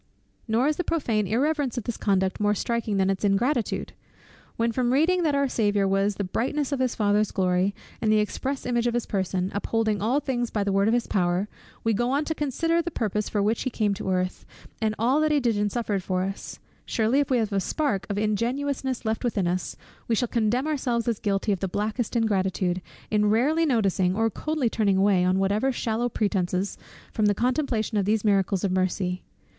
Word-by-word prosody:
Nor 235 +4 +2
is 305 - +1
the 360 - 0
prophane 230 - 0
irreverence 275 +3 0
of 240 - -2
this 235 - -3
conduct 190 -2 0
more 210 0 +2
striking 230 -1 -1
than 190 0 +2
its 195 - -3
ingratitude. 225 +5 0 0.6
When 230 0 +1
from 245 +1 0
reading 330 +7 +3
that 305 -4 +1
our 280 0 +2
Saviour 205 -5 +1
was 195 +1 +1
"the 200 - -2
brightness 265 +9 -1
of 280 - -1
his 255 -2 0
Father's 210 0 +2
glory, 185 +1 +1 0.3
and 215 - +2
the 215 - +5
express 260 +6 -2
image 240 -1 +1
of 240 - 0
his 240 - 0
person, 190 -1 -1
upholding 215 0 0
all 240 +7 +2
things 245 -4 -2
by 210 - -1
the 200 - -1
word 195 +1 +2
of 225 - +3
his 240 - 0
power," 180 +1 0 0.4
we 225 - +2
go 240 +4 0
on 285 +3 +1
to 320 - -1
consider 330 +3 0
the 340 - -3
purpose 215 - -2
for 205 -2 0
which 220 +2 +1
he 260 - -1
came 215 -4 0
on - - -5
earth, 185 -1 -1 0.4
and 215 -1 0
all 255 +7 +2
that 310 - +2
he 295 - +3
did 240 -4 +1
and 205 0 0
suffered 215 -4 -1
for 185 0 -1
us; 195 +1 -5 0.3
surely 230 +5 +1
if 285 - 0
we 255 - +3
have 220 -3 -1
a 195 - +2
spark 200 -3 -1
of 200 - -2
ingenuousness 250 +5 -1
left 220 +2 -1
within 220 -6 0
us, 180 +1 -2 0.3
we 230 - +2
shall 245 +3 0
condemn 235 +4 0
ourselves 255 -7 -1
as 230 -3 0
guilty 200 +1 0
of 195 - 0
the 195 - -1
blackest 215 +5 -2
ingratitude, 190 -5 0 0.3
in 210 -1 +3
rarely 295 +10 +2
noticing, 195 - +1
or 225 +1 +1
coldly 305 +2 -1
turning 205 -4 +1
away, 195 -2 +3
on 185 +1 +2
whatever 205 +7 +1
shallow 235 -1 -1
pretences, 195 -3 -1 0.4
from 215 -1 +2
the 205 - +2
contemplation 240 -3 0
of 195 - 0
these 215 +1 +1
miracles 195 -2 +2
of 195 - +1
mercy. 185 0 0
220 Hz, 210 wpm, -25 LUFS, 195-250 Hz, 0.6 s, the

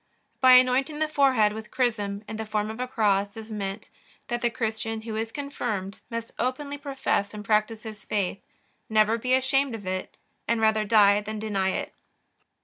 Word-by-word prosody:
By 255 -1 +7
anointing 255 +4 +4
the 310 0 +1
forehead 265 -8 +3
with 220 0 -8
chrism 210 -5 -1
in 220 - -5
the 220 - -3
form 210 0 -1
of 220 - -9
a 250 - -2
cross 205 -4 +1
is 220 0 -8
meant, 200 0 -5 0.4
that 240 -1 -1
the 240 - +2
Christian 225 -1 -3
who 220 -1 -5
is 225 +1 -2
confirmed 225 -9 -4
must 230 0 -5
openly 280 +3 -2
profess 270 -7 -1
and 210 0 -7
practice 215 +1 +1
his 215 -2 -9
faith, 200 -2 -2 0.5
never 215 +1 +3
be 255 +2 +2
ashamed 265 -1 +1
of 205 -3 -9
it, 185 0 -4 0.3
and 230 0 +1
rather 220 -1 +3
die 205 -1 +5
than 215 +1 -5
deny 205 -3 0
it. - - -3
220 Hz, 180 wpm, -26 LUFS, 210-250 Hz, 0.5 s, By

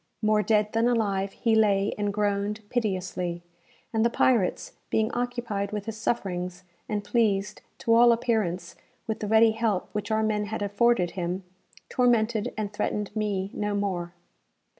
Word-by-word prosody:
More 215 0 +4
dead 210 -1 +1
than 225 +1 +3
alive, 200 -5 +1
he 230 -2 0
lay 205 -2 +3
and 205 -1 -1
groaned 205 +1 -1
piteously, 185 -6 -2 0.5
and 220 0 +2
the 235 - +4
pirates, 230 -5 +1 0.2
being 220 +1 +1
occupied 240 -5 -2
with 210 -1 -4
his 225 - -4
sufferings, 180 -5 -2 0.3
and 210 -1 -1
pleased, 210 -2 0 0.2
to 230 - +1
all 235 +1 +7
appearance, 210 -7 0 0.3
with 220 - -3
the 210 - -3
ready 220 +1 +5
help 220 -4 -1
which 210 -1 -4
our 220 0 +1
men 210 -1 0
had 210 0 -3
afforded 205 -2 +2
him, 180 +1 -3 0.4
tormented 235 -3 +2
and 210 -1 -3
threatened 210 0 -2
me 200 -2 -1
no 210 0 -2
more. 180 -4 -2
210 Hz, 155 wpm, -27 LUFS, 200-225 Hz, 0.5 s, all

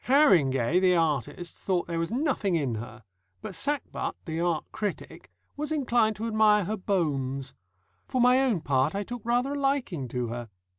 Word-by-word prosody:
Harringay, 170 - +4
the 185 -1 +4
artist, 165 +1 -1
thought 180 -3 -1
there 165 -1 -3
was 165 +3 -2
nothing 245 - 0
in 140 -7 0
her, 110 +1 -7 0.4
but - - -6
Sackbut, 285 - -2
the 160 -1 -3
art 170 -2 0
critic, 210 -3 -5 0.3
was 300 +2 -4
inclined 240 -7 +2
to 215 +3 -4
admire 215 -2 +4
her 210 +5 -2
bones. 140 -9 -1 0.5
For 255 - -1
my 250 +1 +5
own 240 -11 +1
part, 140 +2 +1
I 200 - -1
took 240 +3 -7
rather 245 +4 +1
a 285 - -3
liking 270 - -1
to 120 -1 -3
her. 120 0 -6
185 Hz, 170 wpm, -27 LUFS, 145-240 Hz, 0.5 s, my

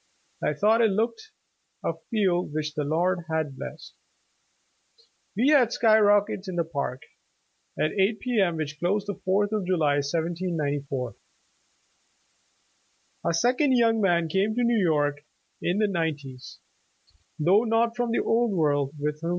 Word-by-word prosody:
I - - +1
thought 220 +8 +3
it 225 - +4
looked 235 - -2 0.6
a - - 0 0.2
field 185 -8 0
which 155 0 -3
the 150 -1 -2
Lord 170 +4 0
had 155 -4 -1
blessed. - - -9 1.4
We 250 +6 +3
had 260 -6 +4
sky 220 -2 +4
rockets 205 -1 +2
in 185 - -5
the 170 - +1
Park 140 -5 -4 0.8
at 155 - +1
eight 205 +2 +1
P. 245 -3 -1
M. 175 -3 +1
which 155 -1 -5
closed 195 +3 0
the 205 - -3
Fourth 200 +2 +1
of 215 -2 -1
July, 155 -6 +2
1794." 145 -5 -3 2.1
A 170 - 0
second 255 - +2
young 230 -2 +3
man 170 -4 +2
came 195 +6 0
to 245 - +1
New 235 -2 +2
York 145 -3 +1 0.4
in 175 +3 0
the 210 0 +2
nine 165 -6 -1
ties, 130 -3 -11 0.8
though 185 +8 +3
not 230 0 +1
from 245 -1 -1
the 230 - 0
old 230 -1 +1
world, 145 -4 0
with 150 +1 -3
whom. 165 - -3
180 Hz, 150 wpm, -26 LUFS, 155-220 Hz, 2.1 s, it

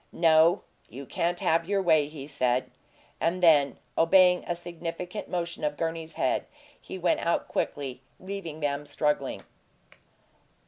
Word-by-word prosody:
"No. 165 0 +4 0.3
You 135 +5 -9
can't 175 +5 -1
have 165 +2 +1
your 200 -1 +2
way," 160 -6 +3
he 150 -2 -9
said. 130 -3 0 0.5
And 180 +2 0
then, 145 -5 +5 0.2
obeying 180 +1 +5
a 175 - -1
significant 175 +3 -6
motion 170 -2 -3
of 150 -1 -1
Gurney's 165 -1 -3
head, - - 0 0.3
he - - -8
went 175 -2 +1
out 170 - 0
quickly, 135 -3 -3 0.2
leaving 185 -5 -6
them 145 0 -2
struggling. 150 0 -1
165 Hz, 135 wpm, -27 LUFS, 145-175 Hz, 0.5 s, then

